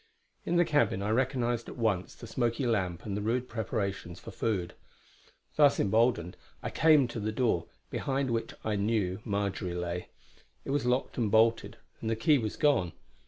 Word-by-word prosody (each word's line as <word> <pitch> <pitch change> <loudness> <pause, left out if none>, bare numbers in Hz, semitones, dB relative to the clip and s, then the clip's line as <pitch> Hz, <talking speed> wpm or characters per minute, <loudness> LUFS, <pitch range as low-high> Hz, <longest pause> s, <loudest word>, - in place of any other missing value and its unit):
In 175 - +1
the 175 0 +5
cabin 145 -11 +1
I 105 - 0
recognised 120 -1 0
at - - -9
once 105 -6 0
the - - -10
smoky 120 +2 -1
lamp 95 -7 -1
and 100 -2 -3
the 105 - -2
rude 120 +4 0
preparations 100 -6 -3
for - - -9
food. 95 -6 -2 0.8
Thus 145 -2 +5
emboldened, 110 -4 +2 0.3
I - - -3
came 155 -4 +5
to 120 - -5
the 110 +1 -2
door, 110 -8 0 0.2
behind 135 -1 -1
which 115 -1 -2
I 110 -1 -1
knew 100 -3 0
Marjory 100 -3 -2
lay. 90 0 -3 0.6
It - - -3
was 140 -3 0
locked 125 +1 0
and 110 -3 +1
bolted, 115 +2 +3 0.2
and 110 - -2
the 115 - +1
key 145 +6 +3
was 110 -3 -3
gone. 140 - +2
115 Hz, 175 wpm, -30 LUFS, 100-125 Hz, 0.8 s, the